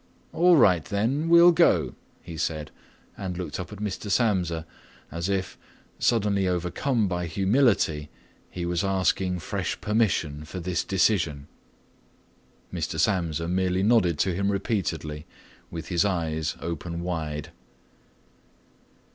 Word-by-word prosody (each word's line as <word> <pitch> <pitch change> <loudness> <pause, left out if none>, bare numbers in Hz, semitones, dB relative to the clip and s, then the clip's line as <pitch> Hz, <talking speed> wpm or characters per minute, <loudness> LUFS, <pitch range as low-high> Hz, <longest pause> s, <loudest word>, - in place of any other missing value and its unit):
"All 175 +1 +5
right, 90 - +5
then 120 - -1
we'll 170 +1 +8
go," 160 - +3 0.3
he 85 - -8
said 75 -1 -3 0.4
and 95 -3 -5
looked 90 0 -5
up 95 - -6
at 105 - -8
Mr. 105 0 -4
Samsa 90 -7 +1 0.5
as 85 +3 -3
if, 95 -2 -2 0.4
suddenly 100 -4 +2
overcome 90 +7 0
by 90 -1 -2
humility, 95 - +2 0.4
he 90 -1 -5
was 85 +1 0
asking 95 -1 +1
fresh - - -3
permission 95 -9 0
for 85 +4 -7
this 90 0 -1
decision. 90 -7 +1 1.3
Mr. 85 -1 -3
Samsa 85 -3 0
merely 90 +1 +1
nodded 100 -7 +3
to 95 +5 +1
him 100 +3 0
repeatedly 85 -7 -2 0.4
with 85 -1 -7
his 85 -3 +2
eyes 80 -5 -1
open 85 +1 -4
wide. 80 -4 -4
90 Hz, 120 wpm, -26 LUFS, 85-100 Hz, 1.3 s, we'll